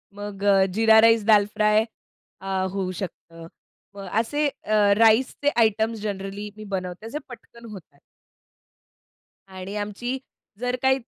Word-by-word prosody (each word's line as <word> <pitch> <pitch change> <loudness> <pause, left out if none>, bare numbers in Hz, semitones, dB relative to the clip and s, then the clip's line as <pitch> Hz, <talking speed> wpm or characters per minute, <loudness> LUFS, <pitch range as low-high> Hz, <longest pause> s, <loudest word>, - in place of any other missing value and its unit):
मग 205 -1 -7
अ, 195 -1 +5
जीरा 220 +1 +5
राईस, 225 -1 +4
दाल 210 -2 +6
फ्राय 215 0 +3 0.6
अ, 190 -1 -2
होऊ 190 -1 -3
शकतं. 165 -3 -9 0.5
मग 195 -1 -8
असे 290 +6 -1 0.2
अ, 215 - -2 0.2
राईसचे 230 +6 +3
आयटम्स 220 0 +1
जनरली 200 0 -5
मी 215 - -9
बनवते. 185 +2 -6
अ, 225 - -6
जे 295 - -5
पटकन 235 -1 -13
होतात. 160 -8 -13 1.5
आणि 190 +1 -8
आमची 210 +5 -4 0.4
जर 250 0 -1
काही 265 0 +3
210 Hz, 135 wpm, -24 LUFS, 195-230 Hz, 1.5 s, दाल